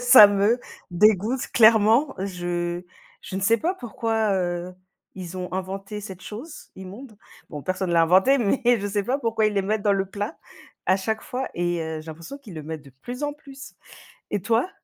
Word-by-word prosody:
Ça 245 -4 +10
me 205 +4 +2 0.3
dégoûte 210 +6 +3
clairement 225 +5 +5
je 175 -2 -3 0.4
je 190 - -6
ne 195 - -2
sais 230 +3 +4
pas 355 - 0
pourquoi, 225 - -1
heu, 180 -1 -2 0.4
ils 185 -1 -7
ont 180 -1 -5
inventé 195 +3 -4
cette 190 -3 -9
chose, 260 +10 -9
immonde. 205 +5 -10 0.3
Bon, 150 -3 -6
personne 185 -1 -2
l'a 170 - +5
inventé, 190 +12 +5
mais 235 +4 +1 0.2
je 205 - -2
sais 205 0 -1
pas 260 +5 0
pourquoi 225 -4 0
ils 215 - +2
le 200 - +2
mettent 210 +2 -1
dans 205 -1 +3
le 195 -1 0
plat 205 - -5 0.5
à 185 - +4
chaque 220 +3 -2
fois 260 +1 -4
et 175 0 -1
heu, 160 -1 -4
j'ai 155 - -14
l'impression 165 - -9
qu'ils 215 -11 -12
le 155 - -6
mettent 160 -1 -6
de 140 - -14
plus 250 +4 -6
en 290 - -1
plus, 275 -2 -12 0.6
et 205 - -1
toi? 230 - +1
205 Hz, 195 wpm, -24 LUFS, 180-230 Hz, 0.6 s, Ça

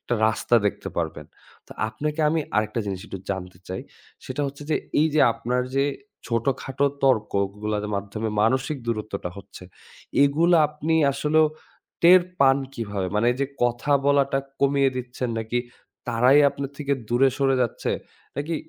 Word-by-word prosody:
একটা 120 - -2
রাস্তা 120 +2 +2
দেখতে 100 - -3
পারবেন। - - -3 0.4
তো - - -11 0.2
আপনাকে 150 +8 -3
আমি 160 +1 +1 0.2
আরেকটা 110 +2 0
জিনিস 95 -2 -3
একটু 95 - -7
জানতে 90 -2 -5
চাই। 95 - -4 0.4
সেটা 130 +3 -3
হচ্ছে 140 +1 -7
যে - - +3 0.2
এই 155 - +4
যে 155 - +4
আপনার 120 +2 -1
যে 135 - +3 0.4
ছোটখাটো 130 +3 -1 0.2
তর্কগুলোর 105 -3 0
মাধ্যমে 105 +3 -4
মানসিক 130 +6 +1
দূরত্বটা 105 -5 -3
হচ্ছে, 100 -1 -12 0.6
এগুলা 165 +5 +4
আপনি 150 +2 -2 0.2
আসলেও 155 +3 +3 0.6
টের 180 +2 +8 0.2
পান 135 0 +6 0.2
কিভাবে? 100 -4 -3
মানে 105 +3 +2
এই 125 - -8
যে - - +1 0.2
কথা 120 +4 0
বলাটা 140 -1 +3 0.2
কমিয়ে 140 -1 +3
দিচ্ছেন? 125 0 -4
নাকি 110 +2 -2 0.5
তারাই 125 +5 +5
আপনার 140 -1 -5
থেকে 140 -1 -1 0.2
দূরে 125 +3 +4
সরে 135 -1 +3
যাচ্ছে, 120 - -2 0.5
নাকি 155 +4 -2
125 Hz, 150 wpm, -24 LUFS, 110-140 Hz, 0.6 s, টের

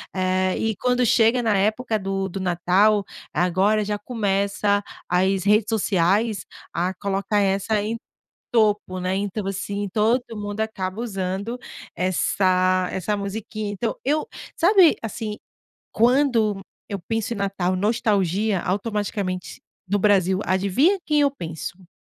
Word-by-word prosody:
Eh, 185 0 +1
e 220 -2 -1
quando 250 +2 +1
chega 230 +2 +4
na 215 -4 +2
época 220 +3 +1
do 195 -1 -2
do 195 - -5
Natal 185 +4 +3 0.3
agora 190 +4 +2
já 210 0 -2
começa 205 -2 0 0.3
as 190 +1 +2
redes 210 +1 +4
sociais 205 +1 +1 0.3
a 180 +2 -1
colocar 200 +2 -1
essa 200 +2 +1
em 225 +2 -2 0.5
topo, 210 -5 +2
né. 185 +1 -1
Então, 200 0 -3
assim, 200 +1 -3
todo 225 +4 +3
mundo 205 +1 -4
acaba 200 -1 -3
usando 200 +1 -3 0.4
essa 185 0 +2
essa 200 +3 -1
musiquinha. 205 +1 -4
Então, 220 +3 -2
eu 300 +2 +1 0.3
sabe 360 -1 +5
assim, 215 -1 -4 0.6
quando 230 -4 +3 0.3
eu 200 -1 -3
penso 225 +1 -1
em - - -6
Natal 195 -2 -1
nostalgia 205 -2 +1
automaticamente 200 -2 -3 0.3
no 205 +2 +1
Brasil, 190 -2 +3
adivinha 200 - +2
quem 300 -1 +2
eu 280 -1 +3
penso? 175 - -7
205 Hz, 130 wpm, -23 LUFS, 190-220 Hz, 0.6 s, sabe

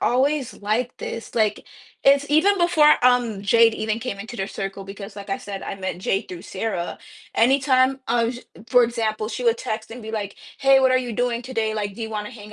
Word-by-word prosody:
always 270 +1 +1
like 220 +4 -2
this. 230 - -7
Like, 215 -2 0 0.4
it's 280 +1 +5
even 380 +7 +4
before, 320 -4 +5
um, 245 -5 +3
Jade 225 +2 +5
even 220 +1 -2
came 235 -4 -5
into 220 +4 -8
their 195 -3 -2
circle- 195 -1 -5
because, 200 +1 -9
like 200 0 -9
I 195 - 0
said, 200 -1 -7
I - - -5
met 190 -2 -4
Jade 195 +1 -1
through 175 -1 -8
Sarah- 190 -4 -4 0.4
anytime, 265 +1 +3
I 235 0 +2
would 235 +2 -2
ju 240 - -9 0.3
For 250 -1 +6
example, 220 -2 -1
she 245 +2 -5
would 230 0 +3
text 220 0 -4
and 235 +1 -9
be 220 - -7
like, 205 -3 -4 0.2
"Hey, 270 -1 +5
what 260 -1 +4
are 255 - +4
you 245 -2 -4
doing 245 +1 -1
today?" 225 -3 -2
Like, 205 -2 -3
"Do 230 - -11
you 220 - -4
wanna 210 -1 -4
hang 210 -3 -11
230 Hz, 220 wpm, -23 LUFS, 205-255 Hz, 0.4 s, For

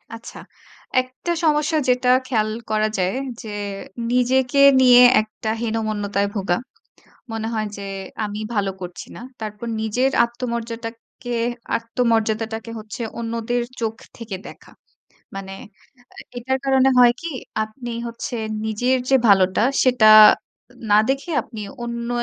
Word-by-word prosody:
আচ্ছা। 230 +1 -11 0.6
একটা 255 +7 -6
সমস্যা 305 +1 +2
যেটা 250 0 +2 0.2
খেয়াল 215 -4 0 0.2
করা 215 0 +1
যায়, 185 +1 0 0.3
যে 220 - -8 0.6
নিজেকে 250 +2 +2 0.2
নিয়ে 250 -1 +8 0.2
একটা 220 0 -6
হীনমন্যতায় 215 -3 -1
ভোগা। 190 -3 0 0.7
মনে 225 0 -3
হয় 215 -1 -1
যে - - -7 0.4
"আমি 210 +1 -5
ভালো 200 -2 0
করছি 180 -1 -8
না।" - - -9 0.2
তারপর 215 +2 -6
নিজের 245 +5 +1 0.2
আত্মমর্যাদাকে 235 0 -6 0.4
আত্মমর্যাদাটাকে 225 -1 -1
হচ্ছে 215 +2 -8 0.2
অন্যদের 230 +1 -2 0.2
চোখ 225 -1 -1 0.2
থেকে 220 -4 -6
দেখা। - - -14 0.7
মানে 195 0 -7 0.8
এটার 260 +2 -1
কারণে 265 0 +4
হয় 240 -1 +7
কি 335 - -5 0.4
আপনি 240 +3 -9 0.2
হচ্ছে 235 +1 -5 0.3
নিজের 245 +4 +1
যে 265 - +6
ভালোটা, 190 +1 +4 0.2
সেটা 250 -4 +4 0.8
না 205 - +6
দেখে 275 +5 -1
আপনি 220 -3 -10 0.2
অন্য 235 0 -4
230 Hz, 120 wpm, -21 LUFS, 215-250 Hz, 0.8 s, নিয়ে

